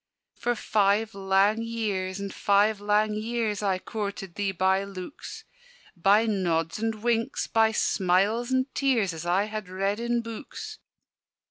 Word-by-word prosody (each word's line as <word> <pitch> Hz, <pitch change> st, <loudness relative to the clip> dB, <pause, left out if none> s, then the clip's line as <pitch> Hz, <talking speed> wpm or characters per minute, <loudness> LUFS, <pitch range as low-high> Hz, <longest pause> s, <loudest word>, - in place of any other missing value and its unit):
"For 240 Hz, 0 st, -1 dB
five 210 Hz, 0 st, +1 dB
lang 195 Hz, +3 st, +2 dB
years, 205 Hz, -5 st, -2 dB
and 200 Hz, -1 st, -5 dB
five 205 Hz, +1 st, +2 dB
lang 210 Hz, +1 st, +2 dB
years, 220 Hz, -1 st, -2 dB
I 195 Hz, -2 st, +1 dB
coorted 200 Hz, -2 st, -5 dB
thee 200 Hz, 0 st, -1 dB
by 190 Hz, +1 st, +2 dB
looks; 195 Hz, +5 st, -8 dB, 0.5 s
By 200 Hz, +5 st, +4 dB
nods 170 Hz, -5 st, 0 dB
and 220 Hz, -1 st, -2 dB
winks, 235 Hz, +2 st, 0 dB
by 225 Hz, -1 st, +3 dB
smiles 205 Hz, +4 st, +1 dB
and 260 Hz, 0 st, +2 dB
tears, 235 Hz, -10 st, +1 dB
As 165 Hz, +1 st, -6 dB
I 185 Hz, +3 st, +3 dB
had 215 Hz, -2 st, -5 dB
read 195 Hz, +3 st, -1 dB
in 235 Hz, 0 st, 0 dB
books. 270 Hz, -, -8 dB
210 Hz, 140 wpm, -27 LUFS, 195-225 Hz, 0.5 s, By